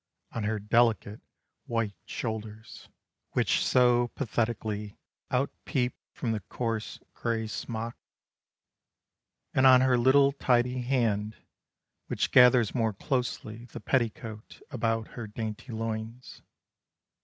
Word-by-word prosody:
On 115 -2 -3
her 110 +1 0
delicate 110 -1 +2 0.5
white 115 -3 -1
shoulders 110 -1 -6 0.4
Which - - +2
so 120 -1 +4
pathetically 110 -4 -2 0.3
outpeep 130 0 -1 0.2
From 115 - -3
the 110 - -1
coarse 115 +2 -4
gray 115 -1 -2
smock, 115 +1 -4 1.6
And 130 0 +5
on 130 -1 +8
her 130 -2 +3
little 135 +3 +5
tidy 125 -2 +1
hand 110 -5 0 0.7
Which - - -1
gathers 125 -3 +6
more 115 -3 +1
closely 120 -2 -3
the - - -9
petticoat 115 -3 -3
About 115 -3 -1
her 120 -3 -7
dainty 110 +3 -6
loins. 115 +2 -5
115 Hz, 105 wpm, -29 LUFS, 110-125 Hz, 1.6 s, on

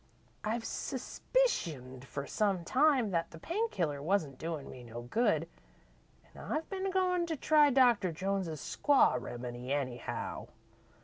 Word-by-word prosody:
I've 225 +2 -1
suspicioned 165 - -1
for 140 +1 -5
some 195 0 0
time 260 - +3
that 165 -2 0
the 165 - -11
pain 420 - -1
killer 150 - -1
wan't 155 -5 0
doin' 160 -3 -4
me 125 - -10
no 120 0 -8
good, 165 - +1 0.9
an' - - -11
I've 310 +1 -2
been 385 0 -1
goin' 365 -2 +1
to 325 - -1
try 300 0 +5
Doctor 245 -8 +4
Jones's 185 -1 -2
Squaw 270 - +3
Remedy, 120 +1 -6
anyhow. 130 -4 -3
185 Hz, 135 wpm, -32 LUFS, -, 0.9 s, try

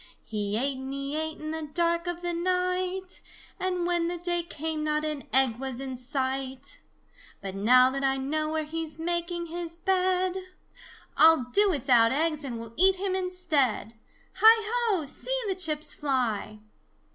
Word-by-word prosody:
He 210 -1 -2
ate 265 +2 0
and 265 0 -6
he 275 +1 -4
ate 315 0 -2
in 310 0 -5
the 320 0 -3
dark 340 0 +1
of 350 0 -4
the 350 0 -1
night, 365 +1 -1 0.4
And 365 -2 -1
when 345 -1 +1
the 350 0 -2
day 345 0 0
came 320 -2 -4
not 305 0 0
an 300 -2 -4
egg 260 -4 +3
was 260 -1 -5
in 265 -1 -5
sight, 265 +1 -4 0.6
But 195 -1 -6
now 250 +6 +5
that 275 +1 -3
I 270 0 +2
know 305 +3 -1
where 315 0 -1
he's 315 0 -5
making 345 +1 -2
his 335 0 -4
bed, 370 0 +1 0.8
I'll 320 -4 +6
do 410 0 +5
without 245 -8 +4
eggs 305 +1 +1
and 245 -4 -5
will 230 0 -9
eat 380 +3 +5
him 380 0 -2
instead! 325 - 0 0.4
Hi, 440 +1 +6
ho, 445 -10 +1
see - - -3
the 390 - +1
chips 310 -5 -1
fly!" 245 -7 -1
315 Hz, 165 wpm, -27 LUFS, 270-355 Hz, 0.8 s, I'll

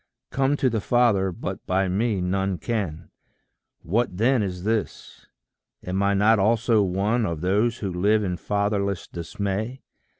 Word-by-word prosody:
"Come 135 +2 +1
to 135 - +2
the 115 -4 0
Father 105 -5 +2
but 85 - -6
by 95 +1 +1
me 100 +1 0
none 95 +1 -1
can:" 85 -5 -4 0.7
What 105 +1 0
then 120 +3 +3
is 90 -3 -4
this? 110 +1 -3 0.6
am 95 +2 -1
I 100 0 +2
not 105 +2 +4
also 115 +2 +3
one 100 +5 +1
Of 85 -6 -3
those 105 +6 +1
who 95 -4 -4
live 105 +4 +2
in 90 -2 -1
fatherless 100 -1 -1
dismay? 100 +8 -4
100 Hz, 145 wpm, -24 LUFS, 95-115 Hz, 0.7 s, not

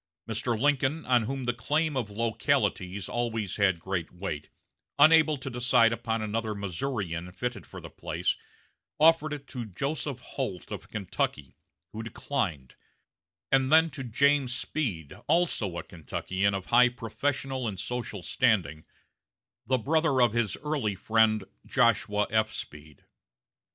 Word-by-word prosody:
Mr. 115 +1 -1
Lincoln, 145 +3 +1
on 125 -3 +3
whom 135 +2 -3
the 120 - +1
claim 150 +7 0
of 120 -5 -1
localities 105 -4 0
always 115 -5 -2
had 95 -4 +3
great 90 -1 -3
weight, 85 -5 -5 0.5
unable 155 0 +6
to 135 - -8
decide 120 -2 +3
upon 115 -1 -2
another 110 0 -2
Missourian 95 -3 -3
fitted 120 +3 -4
for - - -9
the - - -9
place, - - -1 0.6
offered 155 -1 +5
it 145 -2 -5
to 125 -3 -5
Joseph 135 - -3
Holt 90 -4 -5
of - - -7
Kentucky, 90 -8 -3 0.4
who 110 - -5
declined, 110 - -3 0.8
and 135 0 +3
then 160 +1 +6
to 135 0 -6
James 130 +1 +2
Speed, 105 - -3
also 115 - +1
a - - -4
Kentuckian 95 +4 -2
of 95 -1 -4
high 125 0 +7
professional 130 +2 -2
and 100 -4 -4
social 115 -4 -4
standing, 90 - +1 0.8
the 130 - +3
brother 150 +2 +2
of 120 -3 +4
his 115 -5 0
early 140 -10 -1
friend 110 +1 +3 0.2
Joshua 105 0 +2
F. 110 0 +2
Speed. 75 0 -9
115 Hz, 135 wpm, -28 LUFS, 100-135 Hz, 0.8 s, high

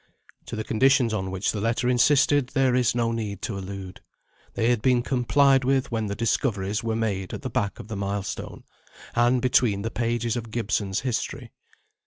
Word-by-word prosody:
To - - -5
the 110 - -3
conditions 130 0 +3
on 95 -3 -2
which 95 +1 -1
the 105 - -4
letter 115 +3 0
insisted 135 +2 +3
there 135 -2 +2
is 125 -2 +2
no 115 -1 +1
need 105 -4 -4
to 110 - -3
allude. 95 -1 -7 0.5
They 115 +2 +2
had 120 -3 0
been 125 -1 +3
complied 135 +2 +3
with 135 0 +1
when 110 -2 -1
the 100 - -3
discoveries 105 -3 -1
were 115 -1 -1
made 100 -5 -2
at - - -9
the - - -4
back 100 -2 -1
of - - -9
the 110 - -5
milestone, 100 0 -4 0.5
and 120 +1 +2
between 120 -6 +2
the 115 - -3
pages 115 0 -1
of 115 -2 -5
Gibson's 105 -3 -1
history. 130 -4 -3
115 Hz, 185 wpm, -25 LUFS, 100-125 Hz, 0.5 s, conditions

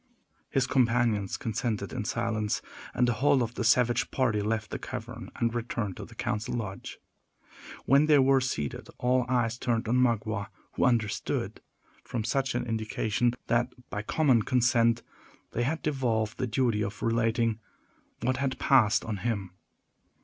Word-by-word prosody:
His 135 -2 +1
companions 120 -6 +1
consented 110 -2 -2
in 120 -5 -3
silence, 110 -2 -1 0.3
and 125 - +2
the 120 - +2
whole 140 -3 +4
of 115 0 -4
the 120 - -3
savage 120 0 +3
party 115 -6 +1
left 110 +1 -2
the - - -3
cavern 120 -1 -7
and 115 -1 0
returned 115 -5 -3
to - - -6
the 115 - -15
council 120 -2 -2
lodge. 100 -5 -5 0.9
When 140 +3 +5
they 150 -1 +6
were 135 0 +4
seated, 75 - -3
all 125 0 +1
eyes 120 -2 +1
turned 115 -2 0
on 120 +3 +2
Magua, 110 -4 +1 0.2
who - - +1
understood, 115 -4 0 0.4
from 120 -4 -3
such 135 +3 0
an 120 - -1
indication, 115 +1 0
that, 120 +1 +1 0.2
by 105 - -2
common 130 +1 +3
consent, 120 0 +2 0.5
they 120 - -2
had 150 +7 -1
devolved 115 -7 -1
the 130 - 0
duty 115 -2 +1
of 100 +1 -5
relating 115 -1 +1 0.6
what 130 +2 0
had 135 -1 -1
passed 120 -5 +4
on 110 -3 -3
him. 100 -4 -2
120 Hz, 155 wpm, -28 LUFS, 110-125 Hz, 0.9 s, they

